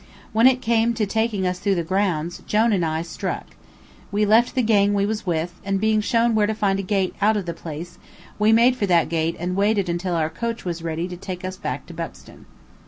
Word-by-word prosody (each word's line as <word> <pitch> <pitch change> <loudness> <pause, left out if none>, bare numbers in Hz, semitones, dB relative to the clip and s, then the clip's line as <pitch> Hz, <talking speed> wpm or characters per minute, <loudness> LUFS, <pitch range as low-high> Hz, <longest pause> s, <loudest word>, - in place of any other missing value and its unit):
When 225 +3 +6
it 260 -1 +2
came 230 0 +2
to 220 - 0
taking 220 -1 -1
us 180 0 -1
through 200 0 +1
the 170 - -1
grounds, 175 -2 -1
Jone 220 +1 +3
and 185 -4 +1
I 160 0 -1
struck. 170 - -4 0.7
We 210 +1 +2
left 225 +4 +3
the 255 - +2
gang 205 -2 +3
we 200 0 +2
was 210 -1 -3
with, 170 0 -1
and 195 0 -1
being 215 +1 +2
shown 230 +1 +2
where 210 -1 +3
to 220 - -1
find 195 -2 +1
a - - 0
gate 195 -1 0
out 215 +1 +3
of 200 - -3
the 170 - -3
place, 165 +1 -8 0.4
we 210 +1 +4
made 235 +3 +5
for 205 -5 -1
that 170 -3 +3
gate 165 0 0
and 180 +2 -3
waited 200 -1 +1
until 175 +1 -1
our 160 -1 0
coach 230 +6 -4
was 170 -2 -3
ready 165 +1 -3
to 180 -1 -7
take 185 0 -6
us 185 0 -4
back - - -4
to - - -11
Buxton. - - -9
195 Hz, 235 wpm, -22 LUFS, 175-220 Hz, 0.7 s, When